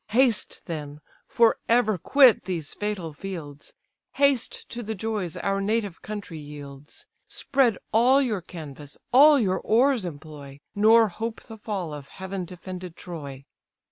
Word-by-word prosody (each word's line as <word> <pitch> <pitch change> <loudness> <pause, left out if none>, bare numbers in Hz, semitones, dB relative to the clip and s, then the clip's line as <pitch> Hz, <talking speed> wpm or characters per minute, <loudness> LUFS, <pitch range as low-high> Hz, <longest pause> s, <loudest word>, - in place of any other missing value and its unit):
Haste 235 -1 +1
then, 150 -3 -6 0.3
for 230 -1 +3
ever 225 -5 +3
quit 265 - +5
these 165 -6 -4
fatal 205 -7 -4
fields, 150 -4 -8 0.4
Haste 280 -3 +1
to 240 - -6
the 220 -1 -4
joys 205 -4 -3
our 195 0 -1
native 205 -3 -1
country 205 -6 -7
yields; 145 -1 -10 0.2
Spread 265 -6 +1
all 250 +5 +5
your 225 -8 0
canvas, 150 -4 -9 0.2
all 290 +2 +8
your 190 -5 +1
oars 245 +1 +3
employ, 145 -4 -9
Nor 220 +2 +5
hope 225 +5 -5
the 225 - -10
fall 195 -7 -4
of 145 -2 -8
heaven 190 -1 -6
defended 180 0 -8
Troy." 140 -7 -8
195 Hz, 140 wpm, -25 LUFS, 155-225 Hz, 0.4 s, all